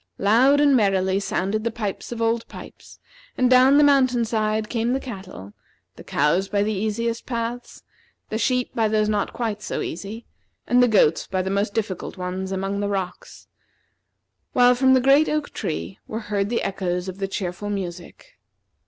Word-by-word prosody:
Loud 250 +8 +4
and 290 -2 +5
merrily 195 -3 +2
sounded 200 +2 -2
the 230 - 0
pipes 215 -2 -5
of 230 -1 -3
Old 230 0 0
Pipes, - - -12 0.4
and 255 0 +2
down 260 +2 +6
the 295 - +6
mountain 255 -4 +3
side 215 -1 -1
came 235 +1 -1
the 265 - 0
cattle, 190 - -9 0.4
the - - -12
cows 180 +6 +1
by 200 -1 +1
the 215 +1 -1
easiest 225 +3 -2
paths, 240 0 -5 0.5
the 220 - -2
sheep 250 +1 0
by 225 -1 +1
those 215 0 +1
not 210 -1 -1
quite 220 -3 -3
so - - -4
easy, 210 +6 -6 0.4
and 245 +1 +3
the 245 - +5
goats 195 -8 +3
by 185 -1 -1
the 190 - -3
most 200 +1 -1
difficult 205 -4 -3
ones 185 +1 -4
among 195 +1 -2
the 205 0 -1
rocks; 190 -3 -5 1.1
while 245 0 +5
from 260 +1 +4
the 260 - +3
great 275 +4 +4
oak 305 -1 -2
tree 85 +4 -5
were 220 +1 -4
heard 200 0 0
the 235 - -1
echoes 180 -2 -2
of 190 +1 -7
the 195 - -1
cheerful 190 +1 -4
music. 190 - -7
215 Hz, 180 wpm, -23 LUFS, 195-245 Hz, 1.1 s, down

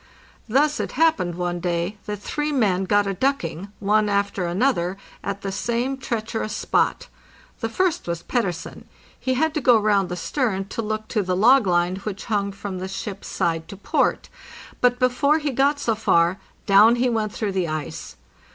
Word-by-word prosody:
Thus 295 +5 +2
it - - -3
happened 230 - +2
one 175 0 -2
day 175 +3 -2
that 210 0 -3
three 295 +9 -3
men 195 -9 +1
got 205 +1 +3
a 195 - -1
ducking, 240 - -1
one 210 +1 +2
after 200 -2 0
another, 185 -2 0 0.3
at 200 0 -4
the 195 - -2
same 235 +7 -1
treacherous 225 -4 -3
spot. - - 0 0.5
The 225 - -2
first 365 - 0
was 170 -1 -3
Pettersen. 185 -9 -3 0.3
He 260 0 0
had 315 +4 +1
to 305 - -1
go 245 -2 +6
round 205 -3 +2
the 175 - -3
stern 195 -2 -1
to 230 - -3
look 215 0 -3
to 215 - +1
the 185 -1 -1
log 245 +2 +5
line 175 +1 +2
which 200 0 -6
hung 200 -3 0
from 195 -1 -6
the 185 - -4
ship's 195 +1 -6
side 165 -3 -1
to 200 - -9
port; - - 0 0.5
but 245 0 +3
before 255 +4 +3
he 295 -2 -2
got 280 +3 +2
so 230 - +1
far, 185 -4 +2 0.3
down 210 +4 +6
he 245 +1 +1
went 220 -3 0
through 210 -1 -2
the 185 -3 -1
ice. 155 -3 -5
210 Hz, 180 wpm, -23 LUFS, 185-245 Hz, 0.5 s, go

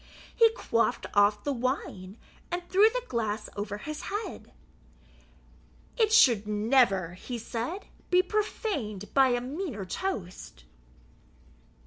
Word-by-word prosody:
He 460 -1 +6
quaffed 230 - 0
off 205 +1 +3
the 285 - -1
wine, 235 -6 -3 0.3
and 350 0 -3
threw 400 +5 +5
the - - -3
glass 220 -2 -2
over 205 0 -4
his 300 +7 -6
head. 410 -2 -5 1.4
"It 440 -2 +2
should 235 - +5
never," 210 -5 +2
he 240 +7 -6
said, 235 - -5 0.2
"be 360 0 +4
profaned 365 - -3
by 270 -1 +6
a 245 -1 +1
meaner 265 - -5
toast." 185 - -5
245 Hz, 115 wpm, -28 LUFS, -, 1.4 s, He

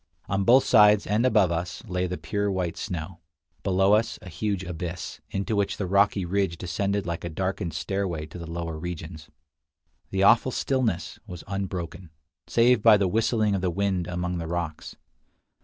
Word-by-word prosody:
On 100 0 0
both 130 +3 +6
sides, 105 -4 +6
and 110 +5 +2
above 105 -7 +3
us, 85 +1 -3
lay 90 -3 -1
the 90 - -4
pure 100 -1 -2
white 90 -3 -2
snow; 85 0 -5 0.4
below 95 +2 +3
us 110 +2 +2
a 90 - -9
huge 100 +3 -2
abyss, 90 0 -6
into 100 +3 -2
which 100 -1 0
the 100 - -2
rocky 100 0 +2
ridge 95 -1 0
descended 100 +3 -2
like 85 -1 -4
a 85 - -3
darkened 90 -1 -3
stairway 85 0 -2
to 90 - -10
the 85 -1 -7
lower 85 -1 -4
regions. 80 -2 -7 0.8
The 95 0 0
awful 115 +5 +5
stillness 120 -10 -1
was 90 -2 -8
unbroken, 95 -3 -5 0.4
save 120 -1 +4
by 110 -1 +7
the 100 -2 +1
whistling 110 +1 +1
of 95 - 0
the 90 - +1
wind 95 -1 -1
among 90 0 -2
the 85 - -4
rocks. 85 -2 -4
95 Hz, 175 wpm, -26 LUFS, 85-100 Hz, 0.8 s, by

